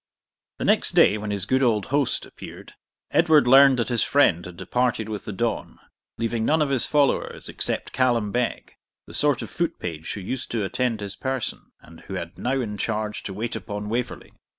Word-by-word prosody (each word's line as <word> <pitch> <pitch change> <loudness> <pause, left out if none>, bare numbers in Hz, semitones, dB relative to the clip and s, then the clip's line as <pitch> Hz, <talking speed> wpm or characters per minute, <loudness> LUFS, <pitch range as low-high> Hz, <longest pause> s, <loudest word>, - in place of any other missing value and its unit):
The - - -3
next - - +3
day, 105 - +5
when 105 0 -5
his 100 -2 -2
good 130 +1 +2
old 110 -6 +2
host 145 -3 +1
appeared, - - -11 0.4
Edward 160 -4 +5
learned 135 +1 +7
that 120 - -1
his 120 -2 +1
friend 90 - +3
had 90 -1 -10
departed 115 +4 0
with 105 -2 -5
the - - -4
dawn, 115 +2 -2 0.4
leaving 115 0 -1
none 155 +7 +2
of 150 -2 +1
his 130 -4 +2
followers 145 -2 +1
except - - -3
Callum 120 -5 +1
Beg, 120 +1 -2 0.3
the - - -12
sort 145 -3 +2
of - - -9
foot 170 -2 -2
page 80 -2 -5
who 100 - -6
used 130 +7 -5
to 115 -3 -1
attend 115 +1 -1
his 100 -1 -5
person, 130 -3 -4
and 85 0 -15
who 95 - -8
had 85 -1 -6
now 135 +2 0
in 105 -4 -5
charge 105 +1 -2
to 95 - -6
wait 115 +3 -3
upon 105 0 -5
Waverley. 120 +2 -4
115 Hz, 195 wpm, -24 LUFS, 105-130 Hz, 0.4 s, learned